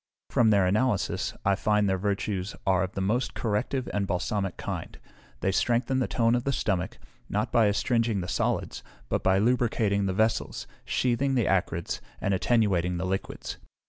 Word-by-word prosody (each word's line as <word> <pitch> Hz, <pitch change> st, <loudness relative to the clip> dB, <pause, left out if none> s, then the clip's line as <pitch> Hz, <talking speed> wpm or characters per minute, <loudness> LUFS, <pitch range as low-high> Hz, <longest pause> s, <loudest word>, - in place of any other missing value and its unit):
From 115 Hz, -2 st, +4 dB
their 100 Hz, -3 st, +4 dB
analysis, 105 Hz, +3 st, 0 dB
I 100 Hz, -, +4 dB
find 105 Hz, +1 st, +2 dB
their 95 Hz, -, +2 dB
virtues 100 Hz, 0 st, -2 dB
are 95 Hz, -2 st, +3 dB
of 95 Hz, 0 st, -2 dB
the 95 Hz, -, -3 dB
most 120 Hz, +7 st, 0 dB
corrective 120 Hz, +4 st, -1 dB
and 100 Hz, -1 st, 0 dB
balsamic 95 Hz, +1 st, -1 dB
kind; -, -, -5 dB, 0.4 s
they 95 Hz, -, +1 dB
strengthen 120 Hz, +6 st, +1 dB
the 130 Hz, -, +1 dB
tone 115 Hz, -1 st, +2 dB
of 120 Hz, 0 st, +1 dB
the 140 Hz, -, 0 dB
stomach, 95 Hz, -8 st, -1 dB, 0.3 s
not 105 Hz, +1 st, -1 dB
by 115 Hz, -3 st, +4 dB
astringing 115 Hz, +1 st, +1 dB
the 90 Hz, -, -5 dB
solids, -, -, -1 dB, 0.3 s
but -, -, 0 dB
by 95 Hz, 0 st, +3 dB
lubricating 110 Hz, -3 st, +2 dB
the 95 Hz, -, 0 dB
vessels, 110 Hz, +4 st, 0 dB, 0.2 s
sheathing 130 Hz, +2 st, +1 dB
the 120 Hz, -5 st, +2 dB
acrids, 90 Hz, -3 st, 0 dB, 0.2 s
and 100 Hz, -, 0 dB
attenuating 95 Hz, -5 st, +2 dB
the 90 Hz, -, -2 dB
liquids. 95 Hz, +1 st, -4 dB
105 Hz, 170 wpm, -27 LUFS, 95-115 Hz, 0.4 s, From